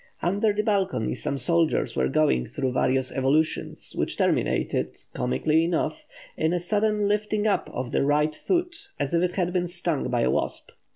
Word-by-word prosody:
Under 200 +5 +2
the 210 +1 -1
balcony 195 - 0
some 140 +3 -3
soldiers 165 +5 +1
were - - +2
going 135 - +2
through 135 -3 -2
various 130 0 +1
evolutions, 140 +4 0
which - - -2
terminated, - - 0 0.2
comically 155 +6 +1
enough, 175 - -1 0.3
in 160 +2 +1
a 180 - +1
sudden 210 +3 +1
lifting 210 +1 0
up 210 - +1
of 125 -1 -4
the - - +1
right 150 +2 +2
foot 350 - -2
as 145 +1 -2
if 170 - +3
it 180 0 0
had 180 -2 -1
been 180 -1 0
stung 170 -6 -2
by 120 -2 +1
a - - +2
wasp. - - -2
170 Hz, 175 wpm, -25 LUFS, 140-205 Hz, 0.3 s, if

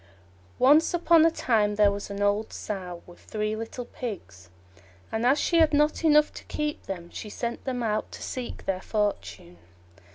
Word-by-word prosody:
Once 300 +7 +5
upon 335 -1 +5
a 330 - +6
time 215 -9 +1
there 205 -1 +5
was 200 0 -5
an 200 0 -3
old 205 +2 +1
Sow 180 -4 -6
with 175 - -15
three 215 0 -3
little 225 +2 -6
Pigs, 95 - -8 0.6
and 225 +2 0
as 275 +3 +4
she 340 - +1
had 310 -2 +4
not 300 +3 +2
enough 300 -1 +4
to - - -10
keep 300 0 -3
them, 175 -3 -6
she 215 - -7
sent 235 +3 -5
them 250 -2 -2
out 215 -1 -1
to - - -8
seek 250 -2 -6
their 190 -1 -1
fortune. 205 - -3
220 Hz, 175 wpm, -26 LUFS, 200-290 Hz, 0.6 s, a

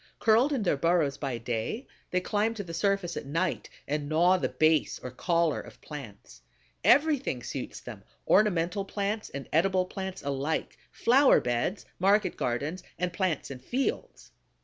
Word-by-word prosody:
Curled 230 +6 +4
in 265 -7 0
their 175 -7 +1
burrows 160 -2 +2
by 135 -4 -2
day, 115 - -3 0.2
they 180 - 0
climb 215 +4 0
to 205 - -4
the 165 -3 -8
surface 195 0 0
at - - -5
night 165 +5 -1 0.2
and 145 0 -2
gnaw 175 +4 +4
the - - -1
base 155 -1 +2
or 125 - -8
collar 170 +3 +1
of - - -14
plants. 105 - -10 0.4
Everything 285 - +3
suits 135 - -5
them: 110 -5 -9 0.2
ornamental 195 -1 +3
plants 205 +2 -3
and 140 -1 -7
edible 185 +3 +3
plants 190 0 -6
alike, 140 +2 -2
flower 265 +4 +5
beds, 120 - -1
market 200 +2 +3
gardens, 145 +9 -2 0.2
and 180 0 -2
plants 175 -6 -1
in 130 - -7
fields. 250 - -3
175 Hz, 155 wpm, -28 LUFS, 140-200 Hz, 0.4 s, flower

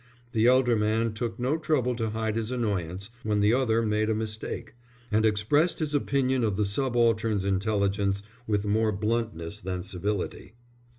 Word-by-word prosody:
The 115 0 +3
elder 125 -1 +5
man 110 +1 +1
took 115 +1 -3
no 130 +6 0
trouble 130 -6 +1
to 110 -2 -1
hide 110 0 -2
his 115 -1 -1
annoyance 100 -5 -2
when 105 -2 0
the 105 +2 +4
other 115 -3 +2
made 110 0 +1
a 110 - +1
mistake, 110 0 -4 0.4
and 110 +1 +3
expressed 115 +11 +2
his 155 -2 -1
opinion 130 -3 +1
of 105 -4 0
the 105 - +2
subaltern's 115 -2 +1
intelligence 100 0 0 0.2
with 105 -1 0
more 110 +1 +2
bluntness 105 -3 -2
than 90 -2 -4
civility. 95 +2 -4
110 Hz, 160 wpm, -27 LUFS, 105-120 Hz, 0.4 s, elder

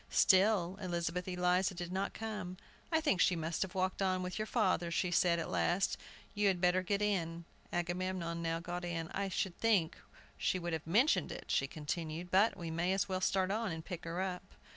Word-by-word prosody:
Still 190 -1 +4
Elizabeth 175 -1 -2
Eliza 180 +1 +1
did 175 0 -5
not 195 +1 -2
come. 210 -5 -5 0.3
"I 320 - +4
think 290 - +2
she 180 - +4
must 165 0 -2
have 190 -1 -2
walked 185 +1 0
on 185 -1 +1
with 180 +3 -4
your 215 - -2
father," 185 -7 +1
she 175 +2 0
said, 175 -1 +3
at 165 - -2
last; 180 +2 +1 0.4
"you 205 0 +2
had 190 -2 +2
better 180 +1 +3
get 200 +2 0
in." 170 -5 -1 0.3
Agamemnon 175 -1 -2
now 165 0 -1
got 175 +1 -5
in. 170 -2 -3
"I 195 0 -2
should 190 -1 -2
think 205 -8 +2 0.4
she - - +1
would 175 -1 -3
have 160 0 -4
mentioned 230 - +3
it," - - -7
she 135 - +2
continued; 160 +3 -4
"but 200 +4 +4
we 170 -2 -5
may 170 +3 +1
as 195 0 +1
well 185 -1 -2
start 190 0 +1
on, 220 -1 -1
and 160 0 -6
pick 180 -4 -6
her 165 +2 -3
up!" 185 -1 -2
180 Hz, 205 wpm, -34 LUFS, 170-195 Hz, 0.4 s, Still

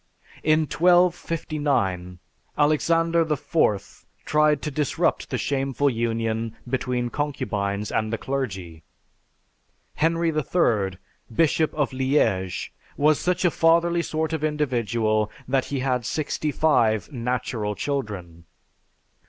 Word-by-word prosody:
In 155 +1 +3
1259, 155 - +1 0.4
Alexander 165 +3 +3
IV 105 - 0 0.2
tried 150 -1 +3
to 150 - -2
disrupt 145 -1 0
the - - -1
shameful 135 0 0
union 115 -1 -2
between 125 -1 -1
concubines 105 -8 -2
and 110 0 0
the 115 - -1
clergy. 95 -12 -4 1.1
Henry 165 +1 +1
III, 115 - +1 0.3
Bishop 155 +5 +2
of 145 -3 0
Liege, 120 -9 0 0.2
was 150 +1 +3
such 180 +1 0
a 175 - +4
fatherly 170 +1 +3
sort 160 -1 -2
of 155 -1 -2
individual 120 -8 0 0.2
that 130 0 +1
he 140 -2 -3
had 125 -2 0
sixty 150 +3 -2
five 115 -7 +2
"natural 120 -4 -2
children!" 100 - -4
135 Hz, 105 wpm, -24 LUFS, 110-155 Hz, 1.1 s, a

